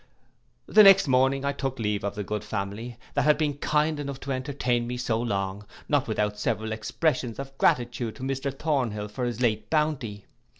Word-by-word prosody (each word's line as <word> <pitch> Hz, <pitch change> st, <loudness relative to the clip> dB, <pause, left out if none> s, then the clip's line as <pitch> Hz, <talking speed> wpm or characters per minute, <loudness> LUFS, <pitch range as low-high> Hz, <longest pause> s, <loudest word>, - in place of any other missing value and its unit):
The 215 Hz, -, +6 dB
next 195 Hz, -4 st, +8 dB
morning 135 Hz, +1 st, +3 dB
I 140 Hz, -, +2 dB
took 135 Hz, -2 st, -3 dB
leave 105 Hz, -3 st, -1 dB
of 100 Hz, 0 st, -2 dB
the 105 Hz, -, -3 dB
good 105 Hz, +1 st, -3 dB
family, 105 Hz, +3 st, -5 dB, 0.2 s
that 140 Hz, -, +2 dB
had 150 Hz, +2 st, +4 dB
been 145 Hz, -2 st, -1 dB
kind 150 Hz, +1 st, +1 dB
enough 140 Hz, -2 st, -5 dB
to 140 Hz, -, -4 dB
entertain 130 Hz, -3 st, -1 dB
me 125 Hz, +1 st, -3 dB
so 115 Hz, -2 st, -1 dB
long, 100 Hz, -3 st, -2 dB, 0.2 s
not 145 Hz, -3 st, +1 dB
without 105 Hz, -1 st, -1 dB
several 110 Hz, 0 st, -1 dB
expressions 120 Hz, +2 st, -1 dB
of 135 Hz, 0 st, -7 dB
gratitude 120 Hz, -2 st, +1 dB
to 130 Hz, -, -9 dB
Mr 135 Hz, +1 st, -2 dB
Thornhill 130 Hz, -8 st, -1 dB
for 125 Hz, +4 st, -3 dB
his 120 Hz, 0 st, -3 dB
late 110 Hz, -3 st, 0 dB
bounty. 140 Hz, -10 st, -1 dB
125 Hz, 185 wpm, -26 LUFS, 110-140 Hz, 0.2 s, next